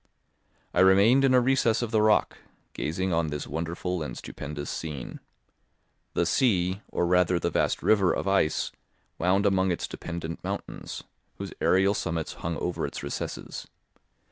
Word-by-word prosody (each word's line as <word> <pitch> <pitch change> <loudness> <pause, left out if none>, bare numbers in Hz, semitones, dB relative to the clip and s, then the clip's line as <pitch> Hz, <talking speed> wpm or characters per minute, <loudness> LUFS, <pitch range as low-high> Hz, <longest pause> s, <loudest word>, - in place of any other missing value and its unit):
I - - +1
remained 100 +8 +6
in 130 -1 +5
a - - +7
recess 125 -2 +2
of 115 - -3
the 110 -2 +3
rock, 110 0 +3 0.3
gazing 90 +4 -2
on 80 -1 +1
this 75 -1 -4
wonderful 85 +4 -3
and 75 - -5
stupendous 75 0 -6
scene. 75 -6 -6 1.0
The 85 - +2
sea, 95 -2 +2
or 90 - -1
rather 90 0 +3
the 85 0 -1
vast - - 0
river 100 -4 +4
of - - -2
ice, 95 -5 +1 0.5
wound 95 +4 +2
among 95 -1 +3
its 85 - -2
dependent 85 -1 -6
mountains, - - -5 0.3
whose - - -6
aerial 95 +2 +4
summits 85 -5 -3
hung 85 0 -2
over 90 - -2
its - - -7
recesses. 70 - -5
90 Hz, 150 wpm, -27 LUFS, 85-100 Hz, 1.0 s, a